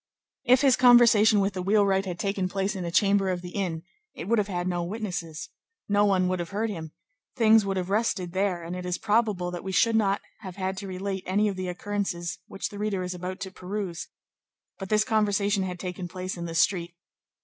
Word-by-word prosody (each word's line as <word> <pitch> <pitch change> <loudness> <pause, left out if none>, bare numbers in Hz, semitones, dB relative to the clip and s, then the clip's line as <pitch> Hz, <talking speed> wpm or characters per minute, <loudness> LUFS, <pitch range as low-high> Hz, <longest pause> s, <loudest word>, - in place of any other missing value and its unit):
If 255 0 +5
his 270 -3 +5
conversation 230 -4 +6
with 195 0 0
the 185 - -3
wheelwright 195 0 +2
had 175 -2 -4
taken 195 -1 -1
place 195 +2 -1
in 185 - -4
a - - -2
chamber 195 +2 +3
of 180 -1 -2
the 175 - -7
inn, 175 -5 -3 0.3
it 165 - -7
would 230 +1 +3
have 205 - 0
had 180 -2 -3
no 175 -1 -1
witnesses, 175 -5 -5 0.4
no 205 0 +3
one 185 -2 +2
would 185 0 -1
have 170 - -4
heard 215 +2 -2
him, 160 -5 -6 0.5
things 220 -4 +5
would 195 -1 -1
have 185 +1 -3
rested 195 -5 0
there, 190 -3 0
and 170 +2 -5
it 180 - -5
is 180 0 -2
probable 210 -5 +1
that 175 - -6
we 190 - -4
should 225 +4 +3
not 200 -2 +2 0.2
have 190 -5 -8
had 190 0 -2
to 195 0 -6
relate 190 +1 -4
any 205 +3 +2
of 200 - -2
the 185 0 -4
occurrences 180 -2 -3
which 195 - -4
the 205 - -9
reader 205 -3 -1
is 180 0 -4
about 180 +1 -6
to 190 -1 -5
peruse; 185 -2 -5 0.7
but 195 -1 -6
this 215 0 +3
conversation 205 -2 +1
had 180 -1 -4
taken 180 -1 -5
place 185 +1 -5
in 170 -1 -5
the 165 -1 -6
street. 175 0 +1
195 Hz, 220 wpm, -26 LUFS, 180-205 Hz, 0.7 s, conversation